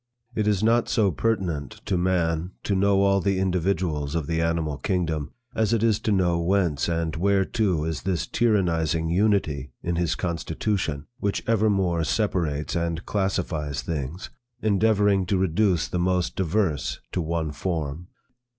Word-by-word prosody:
It 110 -2 0
is 105 -1 +2
not 115 +1 +3
so 105 -5 +3
pertinent 90 - -2
to - - 0
man 90 -1 0
to 100 - 0
know 100 +1 +3
all 100 0 +3
the 95 +1 +1
individuals 90 -5 0
of 80 -3 -1
the 80 +2 -1
animal 80 -3 -1
kingdom, 80 -5 -1 0.2
as 110 0 +1
it 115 -1 +1
is 110 -2 +3
to 110 - -1
know 90 -4 +2
whence 85 -4 +1
and 85 -2 -1
whereto 95 -1 +1
is 80 -1 -3
this 90 -3 -1
tyrannizing 85 -8 +1
unity 85 - +1
in 85 0 -1
his 85 -2 +1
constitution, 80 -2 -2
which 100 -3 -1
evermore 95 -6 +2
separates 80 -6 -1
and 85 0 -2
classifies 80 -9 -1
things, 75 +4 -4 0.3
endeavoring 105 -3 +2
to 95 - +1
reduce 95 -1 +2
the 90 - -2
most 90 0 0
diverse 90 -4 0
to 90 - -1
one 80 -1 -2
form. 80 +1 -3
90 Hz, 150 wpm, -25 LUFS, 80-100 Hz, 0.3 s, not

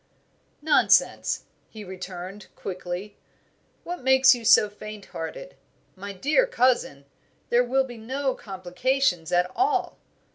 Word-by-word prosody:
"Nonsense!" 315 - +3 0.3
he 215 -1 -10
returned, 185 +1 -8
quickly. 185 +2 -6 0.7
"What 355 -2 -6
makes 265 +1 +6
you 240 -2 -6
so 225 -2 +6
faint 210 0 -10
hearted? - - -7 0.4
My 200 +2 -7
dear 295 - +2
cousin, 250 - +1 0.4
there 240 +1 +4
will 265 +2 +1
be 245 -3 -9
no 260 +4 -2
complications 185 - -1
at 180 +1 +2
all." 390 0 0
220 Hz, 115 wpm, -25 LUFS, 185-265 Hz, 0.7 s, makes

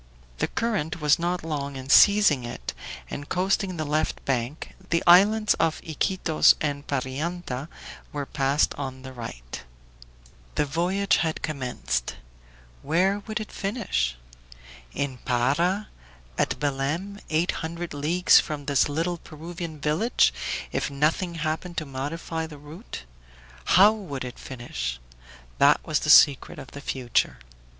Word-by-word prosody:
The - - +1
current 195 -9 -2
was 150 0 +3
not 175 0 -1
long 140 -3 -3
in 130 0 -7
seizing 200 - +6
it, 120 - -6 0.4
and 145 - -6
coasting 185 0 0
the 155 - -2
left 150 +2 -1
bank, 130 +3 -2 0.2
the 170 0 +1
islands 205 +5 +6
of 160 -1 +1
Iquitos 160 +1 +3
and 145 -1 -3
Parianta 140 +1 -3 0.4
were 145 -1 -3
passed 140 +1 +1
on 130 0 -5
the 130 0 -8
right. - - -8 0.9
The - - +2
voyage 180 +7 +1
had 160 -2 -1
commenced 125 - -2 0.7
where 185 +7 +2
would 215 0 -2
it 215 - -7
finish? 195 - -2 0.7
In 135 -2 -3
Para, 145 - +1 0.5
at - - 0
Belem, 150 +8 -2
eight 165 +3 +2
hundred 170 +1 -5
leagues 160 +5 +4
from 150 -2 -4
this 140 0 +2
little 165 +4 -1
Peruvian 165 0 -8
village, 155 - +2 0.4
if - - -1
nothing 155 +5 0
happened 165 +2 -3
to 155 - -1
modify 160 +4 -4
the 150 -2 -11
route. 150 +9 -10 0.6
How 200 +4 +7
would 155 -12 -6
it 125 - -8
finish? 120 - -5 0.6
That - - +6
was - - +1
the - - -3
secret 140 -2 +6
of 135 - -10
the 140 - -9
future. 125 - 0
155 Hz, 135 wpm, -25 LUFS, 135-175 Hz, 0.9 s, How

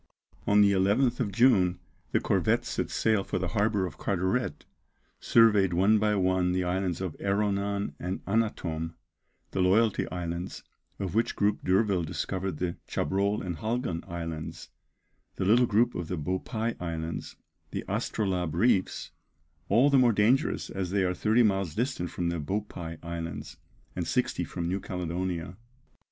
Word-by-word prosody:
On 105 0 +5
the 100 -1 +5
11th 105 +6 +2
of 110 -6 0
June 95 -7 +4 0.3
the - - +3
corvette - - +1
set - - -2
sail 110 -3 +1
for - - -3
the 90 -1 -2
harbour 105 -2 +1
of 80 -6 -8
Carteret; 95 +6 -1 0.5
surveyed 105 -5 +4
one 100 +5 +4
by 105 0 +2
one 95 -1 +2
the 90 0 +1
islands 90 0 -1
of 90 -4 -3
Erronan 100 -2 0
and 90 +2 -4
Annatom, 85 -7 -1 0.6
the 95 - 0
Loyalty 105 +4 +3
Islands, 85 +1 -5 0.3
of 95 -4 -4
which 115 +2 +1
group 105 0 +1
D'Urville 95 0 +2
discovered 90 +1 -3
the 85 0 -2
Chabrol 100 +5 0
and 90 -3 -3
Halgan 110 - -2
Islands, 85 -2 -6 0.7
the - - -2
little 120 +5 +5
group 115 +3 +3
of 90 -2 -4
the 90 - -3
Beaupie 110 - -2
Islands, 80 -1 -4 0.3
the - - -4
Astrolabe 90 -6 -1
reefs, 95 0 +1 0.6
all 125 +8 +5
the 135 - +6
more 120 -2 +5
dangerous 115 +8 +2
as 95 -2 -3
they 100 +1 +1
are 90 0 +1
thirty 110 +6 +3
miles 95 -6 +1
distant 120 -8 -1
from 85 -1 -2
the 85 -1 -2
Beaupie 85 -1 -4
Islands, 85 -1 -6 0.4
and - - -2
sixty - - 0
from 85 - -4
New 95 +3 -1
Caledonia. 90 -1 -4
95 Hz, 150 wpm, -28 LUFS, 90-105 Hz, 0.7 s, the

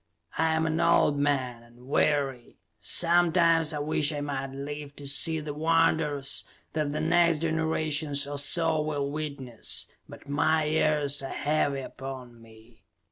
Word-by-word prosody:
I 160 0 +1
am 160 0 0
an 160 0 -1
old 145 -1 +3
man, 130 -5 -1
and 120 +1 -19
weary. 140 -4 0 0.2
Sometimes 170 -2 +3
I 150 - -3
wish 145 0 0
I 150 - -4
might 140 -2 -3
live 145 +1 -7
to 145 - -9
see 160 +3 +3
the 150 -1 -6
wonders 155 -3 +1 0.3
that 150 -2 -1
the 150 - -3
next 170 -1 +2
generation 160 -1 0 0.2
or 145 0 -4
so 160 +2 +1
will 145 -2 -2
witness, 140 -6 -4 0.2
but - - -13
my 145 +2 +1
years 150 -2 +1
are 135 - -6
heavy 145 -2 -1
upon 130 -3 -9
me. 115 0 -19
145 Hz, 145 wpm, -27 LUFS, 140-160 Hz, 0.3 s, old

